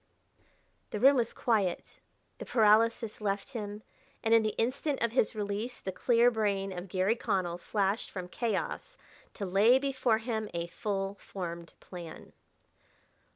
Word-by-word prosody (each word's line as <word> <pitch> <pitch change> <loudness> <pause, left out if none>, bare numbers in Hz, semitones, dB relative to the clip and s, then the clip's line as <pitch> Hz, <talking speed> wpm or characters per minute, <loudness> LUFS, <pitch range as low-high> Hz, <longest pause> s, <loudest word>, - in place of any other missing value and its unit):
The 210 - -4
room 270 +5 +7
was 235 -3 +1
quiet; 210 -7 -1 0.4
the - - -6
paralysis 225 0 +3
left 200 +3 -1
him; 210 -3 -6 0.4
and 225 - +3
in 230 - +7
the 215 -1 -2
instant 265 +5 0
of 235 - +1
his 235 -2 +1
release 210 +4 -3
the 190 - -4
clear 240 +3 +3
brain 200 -4 -1
of 175 +2 -6
Garry 190 +5 +1
Connell 185 -7 -1
flashed 200 +3 -1
from 185 -2 -6
chaos 235 - -3 0.4
to 200 - -4
lay 205 +7 +5
before 265 -4 +1
him 220 -2 -3
a 170 0 -1
full 195 +2 -3
formed 170 -3 -7
plan. 175 -3 -10
210 Hz, 145 wpm, -30 LUFS, 195-230 Hz, 0.4 s, room